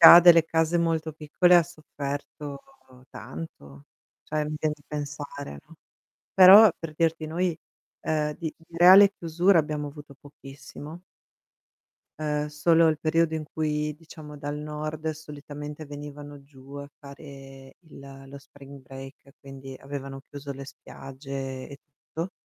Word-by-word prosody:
Chi 165 - +11
ha 170 - +11
delle 170 -2 +7
case 165 +1 +1
molto 160 -1 0
piccole 160 +4 +2
ha 175 - +6
sofferto 145 -3 -7 0.5
tanto, 70 - -10 0.4
cioè 155 0 -2
mi 150 +1 -4
vien 155 -1 0
di 145 - -25
pensare, 145 - -6
no. - - -17 0.6
Però 195 +3 +9
per 165 -2 -7
dirti 165 -1 0
noi, 170 +1 -1 0.4
ehm, 150 -1 -1
di 160 -2 -5
di 165 +1 -16
reale 190 +3 +8
chiusura 175 +3 +2
abbiamo 150 -1 -2
avuto 145 -1 -12
pochissimo 145 +3 -12 1.2
ehm, 150 -1 -2
solo 165 +2 +4
il 155 -1 0
periodo 160 0 +1
in 155 -1 -3
cui, 150 -1 -2
diciamo 155 -2 -12
dal 145 +1 -5
nord 155 +1 -5
solitamente 150 0 -9
venivano 145 0 -9
giù 140 -1 -16
a 140 0 -7
fare 135 -2 -13
il 140 -4 -13
lo 140 +1 -10
spring 140 0 -14
break, 135 +1 -12
quindi 135 -1 -10
avevano 135 -1 -7
chiuso 140 0 -7
le 135 0 -9
spiagge 135 -1 -8
e 140 - -11
tutto. 160 +5 -8
150 Hz, 140 wpm, -26 LUFS, 140-160 Hz, 1.2 s, Chi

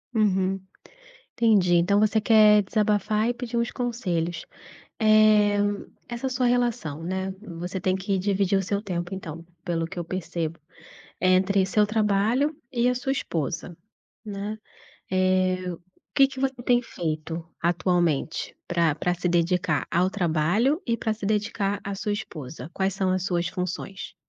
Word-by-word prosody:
Uhum, 195 -3 +2 0.7
entendi, 205 -7 +4
então 180 +4 +3
você 215 +1 +3
quer 215 -1 +6
desabafar 210 +1 +1
e 245 - 0
pedir 240 -1 -5
uns 235 0 +1
conselhos, 175 -9 -2 0.6
eh, 215 -1 +5 0.5
essa 240 +2 -3
sua 255 -1 0
relação, 240 - 0
né, 190 +2 -2 0.3
você 180 +2 -3
tem 185 0 +1
que 190 +1 -1
dividir 195 0 +1
o - - 0
seu 200 +2 -1
tempo 175 -2 -3
então, 165 -3 -7 0.2
pelo 165 -2 -1
que 180 +2 -8
eu 175 - -2
percebo, 170 -2 -4 0.6
entre 185 +1 +3
seu 210 +2 +3
trabalho 215 +7 +1 0.2
e 245 -2 +2
a 250 - +2
sua 250 +2 -2
esposa, 170 - -3 0.5
né, 205 +1 -4 0.5
eh, 185 -1 +1
o 170 - -10 0.3
que 270 -1 +6
que 270 - -10
você 265 -2 -1
tem 245 0 +3
feito 165 -5 -4 0.2
atualmente 175 -3 0
pra 165 -3 +2
pra 175 +4 0
se 180 0 -2
dedicar 170 -3 +1
ao 180 +2 +2
trabalho 195 - +1
e 235 - +1
pra 220 -2 -1
se 215 - -8
dedicar 205 -1 0
à 200 - -4
sua 205 +2 -2
esposa? 155 -6 -6
Quais 190 0 0
são 190 -1 0
as 185 0 0
suas 175 -3 0
funções? 185 +2 -5
195 Hz, 150 wpm, -25 LUFS, 175-215 Hz, 0.7 s, quer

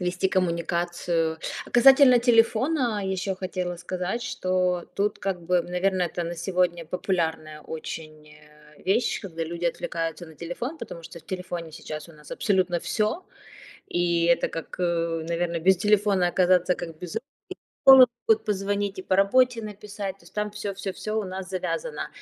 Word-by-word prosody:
вести 180 +1 0
коммуникацию. 170 -2 0 0.3
А - - -13
касательно 265 +1 +7
телефона 235 +1 +3
еще 190 0 -2
хотела 185 -1 -4
сказать, 185 +6 -3
что 185 -5 0
тут, 205 +1 0
как 190 -3 -3
бы, 180 0 +2
наверно, 180 +2 0
это 175 0 -2
на 170 +1 -4
сегодня 175 -1 0
популярная 160 -3 -2
очень, 155 -1 -8
э, 150 0 -19
вещь, 215 +6 +1
когда 165 -4 -4
люди 170 +2 -5
отвлекаются 165 0 -3
на 160 - -14
телефон, 205 - -5
потому 170 - -8
что 170 +1 -10
в - - -17
телефоне 180 -3 -5
сейчас 155 +2 -7
у - - -13
нас 150 -1 -16
абсолютно 185 -4 +1
всё. 215 - -1 0.7
И 170 -1 +1
это 170 0 +3
как, 165 +2 -7
э, 170 -2 0
наверно, 170 0 -1
без 190 +3 +5
телефона 200 -2 +3
оказаться, 180 0 +3
как 165 -2 -8
без 180 -2 -7
рук. 225 - -1 0.4
И - - -
со - - +13
школы 260 -1 +10 0.2
могут 220 0 +4
позвонить, 200 -1 -1
и - - -4
по 185 - +1
работе 235 +4 +4
написать, 205 -2 -6
то - - -24
есть - - -17
там 210 0 -1
всё-всё-всё 200 0 -5
у - - -4
нас 185 0 -6
завязано. 460 - -3
180 Hz, 165 wpm, -26 LUFS, 170-205 Hz, 0.7 s, со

